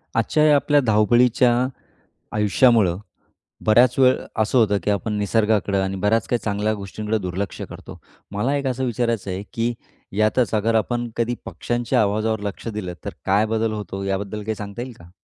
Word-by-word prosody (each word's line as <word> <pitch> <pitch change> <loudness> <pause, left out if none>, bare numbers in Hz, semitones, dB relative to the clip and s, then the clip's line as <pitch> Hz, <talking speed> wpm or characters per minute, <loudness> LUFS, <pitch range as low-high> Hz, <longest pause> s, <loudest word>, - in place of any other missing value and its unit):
आजच्या 150 +6 +3
आपल्या 145 +1 +3
धावपळीच्या 120 +3 +4 0.9
आयुष्यामुळं 105 -3 +3 0.7
बऱ्याच 115 +3 +5
वेळ 130 -1 +6 0.3
असं 110 +4 +1
होतं, 105 -4 +4
की 105 - -1
आपण 105 +2 -1
निसर्गाकडं 105 -1 +1
आणि 95 0 -2
बऱ्याच 105 +4 +1
काही 120 - 0
चांगल्या 105 +1 0
गोष्टींकडे 105 +2 -3
दुर्लक्ष 95 0 -4
करतो. - - -10 0.3
मला 110 +8 0
एक 140 - -4
असं 130 0 -1
विचारायचं 115 -4 -1
आहे, 95 +2 -4
की 120 0 0 0.4
यातच 110 +3 +2
अगर 110 +2 +1
आपण 120 +2 0
कधी 120 +1 0
पक्षांच्या 120 -2 -1
आवाजावर 110 +1 0
लक्ष 100 +2 -5
दिलं, 105 -5 -4
तर - - -4
काय 100 +3 +3
बदल 110 0 0
होतो? 100 -2 -5
याबद्दल 100 +2 -3
काही 110 +1 -3
सांगता 100 +2 -7
येईल 125 0 -6
का? 85 0 -15
110 Hz, 160 wpm, -22 LUFS, 100-120 Hz, 0.9 s, वेळ